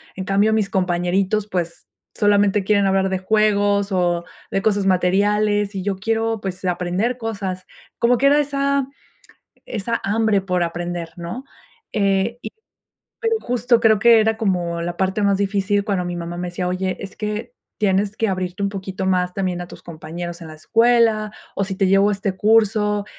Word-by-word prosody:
En 190 - -4
cambio 200 +3 +2
mis 215 -2 +1
compañeritos, 185 +3 0
pues, 175 -4 -4 0.3
solamente 205 -1 +3
quieren 200 0 +2
hablar 195 0 +2
de 190 - 0
juegos, 205 0 +2
o 175 -2 +1 0.3
de 195 - 0
cosas 205 -2 +1
materiales, 205 +3 +2
y 190 - -3
yo 200 0 -1
quiero, 225 +2 -1
pues, 185 -1 -5
aprender 180 +7 -1
cosas, 200 -6 -4 0.3
como 240 +1 +3
que 275 - +3
era 290 +1 +5
esa 280 -1 0 0.8
esa 230 +1 -3
hambre 215 0 +2
por 180 -2 -1
aprender, 175 0 -3
¿no? 175 +10 -6 0.5
Eh, 200 +2 +1
y - - -6 0.7
pero 455 0 +1
justo 245 -1 +1
creo 220 -2 +4
que 230 +2 +6
era 220 +1 +1
como 175 -6 -1
la 175 +1 -4
parte 190 +2 0
más 200 -1 +2
difícil 200 0 +1
cuando 195 -4 -1
mi 175 0 -4
mamá 170 0 -5
me 180 0 -4
decía: 180 +1 -3
"Oye, 185 +1 -2
es 195 -1 -8
que 210 +3 -4 0.3
tienes 200 0 +1
que 225 - 0
abrirte 185 +1 -3
un 200 - +1
poquito 190 -1 -5
más 180 -1 +1
también 185 -2 -2
a 175 - -5
tus - - -13
compañeros 170 +1 -7
en 165 - -9
la 155 - -9
escuela 225 +4 +2 0.2
o 200 - +1
si 190 0 -4
te 190 0 +1
llevo 195 +1 +4
a - - +1
este 195 -1 -3
curso. 210 -1 +2
195 Hz, 180 wpm, -21 LUFS, 185-215 Hz, 0.8 s, que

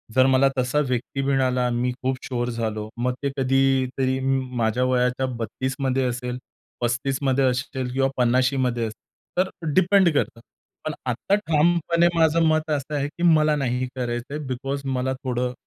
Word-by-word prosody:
जर 130 - +6
मला 130 +1 +5
तसा 125 +3 +1
व्यक्ती 125 +2 -2
मिळाला, 130 -2 +1
मी 120 +1 0
खूप 130 0 0
शुअर 120 -1 -2
झालो 110 -2 -3
मग 125 0 +1
ते 140 - +1
कधीतरी 130 0 +1
म 135 0 +1 0.2
माझ्या 115 +2 +1
वयाच्या 125 +1 +1
32मध्ये 130 +4 -3 0.3
असेल, 125 0 -4 0.4
35मध्ये 130 +3 0
असेल 130 -1 0
किंवा 135 0 +2
50मध्ये 130 +2 +3
असेल. 120 -2 -1 0.5
तर 185 +1 +2 0.2
डिपेंड 185 0 +5
करतं. 130 -4 -1 0.5
पण 155 - -2
आता 130 - +1
ठामपणे 170 -1 +2
माझं 165 0 +3
मत 155 0 +1
असं 150 +1 -2
आहे 140 0 0
की 160 +4 -7
मला 155 -3 +4
नाही 130 -2 -1
करायचंय 120 +3 -3
बिकॉज 135 +2 -3
मला 130 0 -1
थोडं 125 -1 -1
130 Hz, 150 wpm, -24 LUFS, 125-140 Hz, 0.5 s, जर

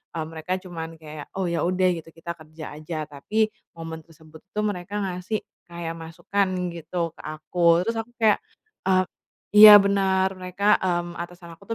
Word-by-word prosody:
e - - -3
mereka 160 +3 -4
cuman 165 -3 -7
kayak 155 -1 -10
oh 190 -2 -1
ya 170 - 0
udah, 185 0 +2
gitu 165 - -13
kita 170 +1 -6
kerja 155 -1 -10
aja. 155 0 -4
Tapi 215 +10 0 0.3
momen 165 -1 -7
tersebut 160 -1 -16
itu 210 - -3
mereka 200 -1 -3
ngasih 185 +3 -3 0.2
kayak 170 -1 -5
masukan 185 +5 -1 0.3
gitu 170 0 -3
ke - - -13
aku, 170 +3 +2
terus 230 - 0
aku 225 +2 -6
kayak, 215 -2 +4 0.5
eee 185 0 +4 0.5
iya 210 0 +12
benar, 190 -1 +2
mereka, 190 +3 +2
mmm, 175 -2 -2
atasan 175 0 -8
aku - - -20
175 Hz, 165 wpm, -24 LUFS, 160-190 Hz, 0.5 s, iya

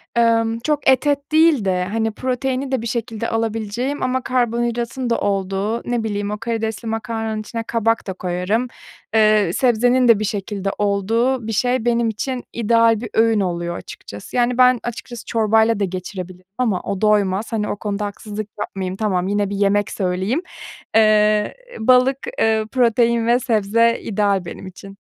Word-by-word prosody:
emm, 230 -1 +2
çok 295 +3 -1
et 265 +2 +3
et 285 +1 0
değil 315 -8 +4
de, 180 -1 +1
hani, 225 0 0
proteini 260 +3 -2
de 260 -4 0
bir 230 - -4
şekilde 230 -1 -3
alabileceğim 225 +5 -2
ama 255 0 0
karbonhidratın 240 0 -1
da 230 - +1
olduğu, 200 +3 -1
ne 240 -2 0
bileyim, 205 -1 -2
o 210 - -3
karidesli 225 0 -3
makarnanın 225 0 -3
içine 230 +1 -5
kabak 225 -1 0
da 190 - -2
koyarım. 185 +7 -1 0.5
Eee, 215 -5 +4
sebzenin 245 +1 +3
de 230 -3 +6
bir 215 - -1
şekilde 200 -1 -3
olduğu 220 +5 0
bir - - -2
şey 245 +2 0
benim 235 -1 +2
için 250 +4 -4
ideal 230 -1 +3
bir 230 - -5
öğün 225 -1 +3
oluyor 175 -2 -2
açıkçası. 100 0 -10
Yani, 245 0 +2
ben 255 -1 +5
açıkçası 240 0 -7
çorbayla 220 0 +2
da - - +1
geçirebilirim 185 0 -7
ama 225 -8 0
o 195 - -4
doymaz. 210 0 +2
Hani, 215 -2 -1
o - - -2
konuda 205 0 -3
haksızlık 210 +1 -6
yapmayayım. 190 -2 -4
Tamam, 190 -4 0
yine 205 0 0
bir 200 - -3
yemek 205 0 +1
söyleyeyim. 190 - -1 0.6
Eee, 215 -1 +4 0.2
balık, 255 +3 +4 0.2
eee, 220 -1 +2
protein 235 -2 +2
ve 240 +1 +4
sebze 230 -1 +2
ideal 200 -3 0
benim 175 - -8
için. 195 +2 -11
225 Hz, 160 wpm, -20 LUFS, 205-240 Hz, 0.6 s, de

